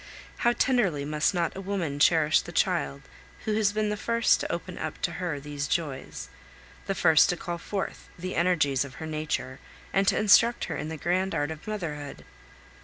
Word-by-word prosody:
How 240 - +3
tenderly 200 - +1
must 150 +1 +1
not 170 -4 -1
a 195 - -5
woman 180 -7 -3
cherish 155 0 +4
the - - -9
child 70 0 0 0.4
who 215 - 0
has 210 -1 +2
been 215 0 0
the 210 - -1
first 230 +2 +2
to - - -3
open - - -5
up - - -4
to - - +1
her 165 -5 -2
these 145 0 -4
joys, 145 -6 -3 0.6
the 195 - -1
first 160 -3 +5
to 180 - 0
call 170 0 -5
forth 195 +3 -5
the 185 +1 -5
energies 155 -6 +2
of 140 -1 -10
her 160 - -7
nature 155 -5 -3 0.3
and 195 0 +2
to - - +4
instruct 230 +3 +5
her - - -3
in 155 - -4
the 160 - -5
grand 185 +5 0
art 145 +2 0
of 160 +4 -9
motherhood! 155 -9 -5
170 Hz, 190 wpm, -27 LUFS, 150-195 Hz, 0.6 s, first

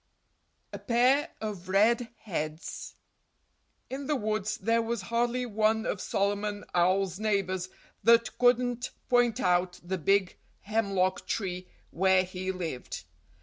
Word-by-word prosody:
XX - - -46
A - - -5
Pair 255 +5 +3
Of 200 -4 -5
Red 225 +5 +3
Heads 155 -5 -5 0.9
In 270 +1 -5
the 300 - +1
woods 215 -2 -1
there 230 +1 +2
was 230 -3 -3
hardly 240 +4 0
one 220 0 +1
of 190 - -2
Solomon 205 +1 -1
Owl's 185 +1 +2
neighbors 190 -4 0 0.3
that 230 0 +4
couldn't 245 0 +2 0.2
point 245 -2 +3
out 180 0 +1
the 185 +1 -3
big 195 +3 +2 0.2
hemlock 195 -3 0
tree 180 -3 -3 0.2
where 190 +1 +3
he 185 +1 -4
lived. 165 - -5
205 Hz, 125 wpm, -29 LUFS, 185-230 Hz, 0.9 s, that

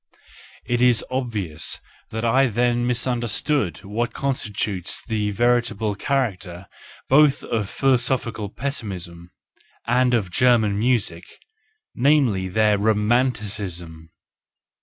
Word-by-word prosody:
It 120 0 0
is 125 -2 +4
obvious 105 - -2 0.3
that 110 +1 -3
I 130 +4 +4
then 120 +1 +1
mis¬ 125 -1 0
understood 120 - -1
what 110 +4 -3
constitutes 105 -8 -1
the 105 -3 -1
veritable 115 -1 +1
character 100 -7 -2 0.4
both 145 0 +4
of 105 -4 -2
philosophical 120 -5 0
pessimism 95 -9 -6 0.6
and 125 +1 +2
of 100 -6 -1
German 110 -4 +3
music, 105 -8 0 0.4
— - - -41 0.2
namely, 125 -9 +2
their 105 +2 +2
Romanticism 105 -7 -1
110 Hz, 100 wpm, -22 LUFS, 100-125 Hz, 0.6 s, is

